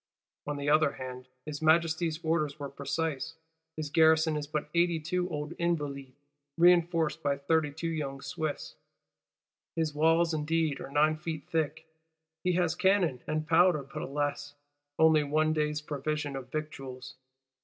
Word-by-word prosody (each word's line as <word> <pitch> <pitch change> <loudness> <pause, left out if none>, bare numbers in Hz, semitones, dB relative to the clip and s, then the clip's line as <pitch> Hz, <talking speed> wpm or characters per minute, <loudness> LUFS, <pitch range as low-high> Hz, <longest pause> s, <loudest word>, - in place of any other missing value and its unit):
On 145 0 -2
the 140 0 -4
other 150 -1 +4
hand, 130 -1 -8 0.2
His 150 -1 -6
Majesty's 160 0 +2
orders 155 -3 0
were 140 -2 -5
precise. 145 +2 -3 0.4
His 150 -2 -4
garrison 160 0 +4
is 150 -1 -3
but 150 0 -3
eighty 170 -1 +2
two 180 +3 -2
old 150 -1 -4
Invalides, 145 -6 -2 0.4
reinforced 170 -2 +4
by 140 -2 0
thirty 150 +1 +1
two 160 +3 -4
young 145 -4 -3
Swiss; 145 +2 -4 1.0
his 160 -2 0
walls 165 +2 +3
indeed 155 -1 0
are - - -7
nine 155 +2 +3
feet 155 -2 -5
thick, 160 -1 -1 0.6
he 180 - +2
has 175 -2 +2
cannon 175 -8 +2
and 155 0 -2
powder; 170 -2 +4
but, 135 0 -7
alas, 145 +1 -3 0.4
only 160 -1 +5
one 155 +2 +1
day's 150 -1 0
provision 150 -1 -3
of 130 -1 -7
victuals. 135 -4 -6
155 Hz, 145 wpm, -30 LUFS, 145-165 Hz, 1.0 s, only